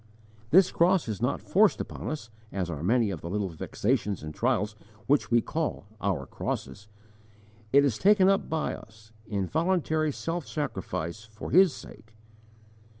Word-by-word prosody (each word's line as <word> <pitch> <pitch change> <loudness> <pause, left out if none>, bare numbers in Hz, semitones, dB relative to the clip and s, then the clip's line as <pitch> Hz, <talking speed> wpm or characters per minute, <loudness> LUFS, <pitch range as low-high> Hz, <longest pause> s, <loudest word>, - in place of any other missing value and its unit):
This 185 +6 +6
cross 175 -2 +3
is 110 -1 -4
not 125 +3 0
forced 205 +1 +4
upon - - -5
us 115 -8 -5 0.2
as 90 -3 -2
are 75 -2 -5
many 110 +4 +2
of 85 - -5
the 85 - -6
little 100 0 -1
vexations 100 - -1
and 75 0 -6
trials 110 0 0 0.3
which 145 +4 +2
we 120 0 +4
call 160 -6 -3 0.2
'our 90 -9 -1
crosses'; 70 +7 -5 0.8
it 140 +1 +6
is 120 -6 0
taken 195 -1 +5
up 195 0 +2
by 160 -1 -1
us, 110 0 -13 0.2
in 100 -3 -1
voluntary 160 - +1
self 165 +3 -4
sacrifice 110 - -4
for 110 0 -8
His 185 0 +6
sake. 115 -3 -13
120 Hz, 155 wpm, -28 LUFS, 100-160 Hz, 0.8 s, This